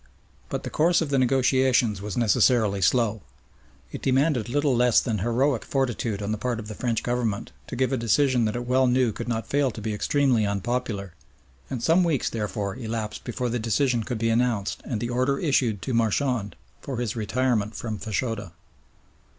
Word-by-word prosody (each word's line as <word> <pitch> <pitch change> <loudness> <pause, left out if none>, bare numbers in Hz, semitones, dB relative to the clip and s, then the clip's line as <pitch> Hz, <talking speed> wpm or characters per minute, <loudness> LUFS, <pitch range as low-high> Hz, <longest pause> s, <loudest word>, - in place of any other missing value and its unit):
But - - -3
the - - -5
course 170 +2 +3
of 150 -3 -2
the 135 - +3
negotiations 130 -4 +2
was 105 +2 -5
necessarily 110 -2 +3
slow. 110 +2 +2 0.7
It - - -6
demanded 135 -3 +1
little 145 0 +1
less 120 -1 +4
than 110 -5 -2
heroic 120 +4 +1
fortitude 120 -6 -1
on 100 - -2
the 110 - -2
part 125 -1 -1
of 105 - -7
the 105 - -6
French 115 +1 -2
Government 120 -4 -2 0.2
to - - -6
give 130 +1 0
a - - +1
decision 125 +1 +2
that 110 - -1
it 120 0 -3
well 130 +1 +3
knew 125 -1 +2
could - - -6
not 115 -2 -2
fail 140 -1 +1
to 110 - -8
be 110 0 -3
extremely 130 +1 +2
unpopular, 100 -1 -2 0.6
and 120 -3 -4
some 170 +3 +4
weeks 160 -7 0
therefore 105 -2 -3
elapsed 110 -3 -4
before 125 +1 -3
the 120 +1 -1
decision 115 +2 +1
could 120 +1 -3
be 115 +1 0
announced 115 -4 0
and 115 -5 -3
the 120 - -2
order 130 +3 +1
issued 125 - +1
to 130 - -2
Marchand 115 -3 0 0.3
for 135 -3 -5
his 120 -2 -2
retirement 115 -1 0
from 110 -3 -4
Fachoda. 110 -4 -3
120 Hz, 185 wpm, -25 LUFS, 110-130 Hz, 0.7 s, less